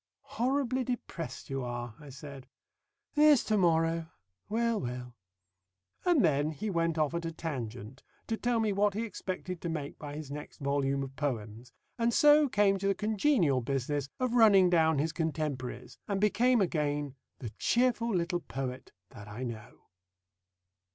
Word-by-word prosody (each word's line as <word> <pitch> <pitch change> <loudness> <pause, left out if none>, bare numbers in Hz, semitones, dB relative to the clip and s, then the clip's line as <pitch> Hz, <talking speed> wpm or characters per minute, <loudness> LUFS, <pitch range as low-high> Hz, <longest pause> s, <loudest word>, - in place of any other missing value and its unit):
"Horribly 260 0 +1
depressed 230 - -5
you 135 -1 -2
are!" 120 -1 -5
I 150 -1 -12
said. 135 0 -10 0.7
"There's 300 -3 +6
to 215 - 0
morrow. 165 -3 +2 0.4
Well, 230 0 +1
well...." 125 0 -5 0.9
And 345 - +4
then 145 -1 +2
he 210 +7 -4
went 165 -2 0
off 155 0 +1
at 170 0 -2
a 165 - -3
tangent 130 -7 -6 0.2
to 225 - -1
tell 240 +1 0
me 215 -2 +1
what 200 0 +2
he 220 - -1
expected 185 -4 -5
to 170 - -3
make 150 -3 -5
by 145 -1 -7
his 150 -2 -7
next 150 +1 -8
volume 140 -1 0
of 135 0 -8
poems, 120 -5 -4 0.3
and 230 0 +2
so 295 -1 +6
came 205 -3 +3
to 195 - -1
the 195 - +2
congenial 210 - +2
business 135 +2 -2
of 255 -2 0
running 200 -6 +6
down 160 -3 +4
his 155 +4 0
contemporaries, 145 -7 -3
and 200 -1 -1
became 235 +3 +3
again 145 -5 -1 0.2
the 115 -5 -7
cheerful 240 -1 +2
little 175 -2 0
Poet 130 -5 -6 0.2
that 105 -4 -11
I 105 +5 -6
know. 115 -3 -7
165 Hz, 160 wpm, -30 LUFS, 135-215 Hz, 0.9 s, There's